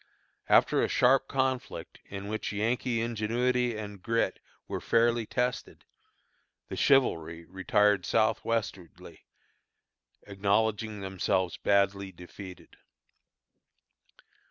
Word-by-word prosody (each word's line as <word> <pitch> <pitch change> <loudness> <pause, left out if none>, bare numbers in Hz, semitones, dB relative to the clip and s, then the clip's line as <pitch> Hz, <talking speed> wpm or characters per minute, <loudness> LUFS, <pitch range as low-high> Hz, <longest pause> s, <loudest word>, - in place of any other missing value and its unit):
After - - +5
a - - +2
sharp 135 +2 +3
conflict, 130 -2 -2
in 100 0 -6
which 110 +1 -3
Yankee 115 +3 0
ingenuity 120 +1 0
and 105 -2 -7
grit 115 +4 0 0.3
were - - -4
fairly 115 -1 +2
tested, 125 0 -3 0.8
the - - -5
chivalry 85 - +2
retired 100 +3 +2
southwestwardly, 110 -5 -1 1.1
acknowledging 105 +1 0
themselves 95 -2 -1
badly 100 -1 +1
defeated. 90 +1 -12
105 Hz, 85 wpm, -29 LUFS, 100-120 Hz, 1.1 s, After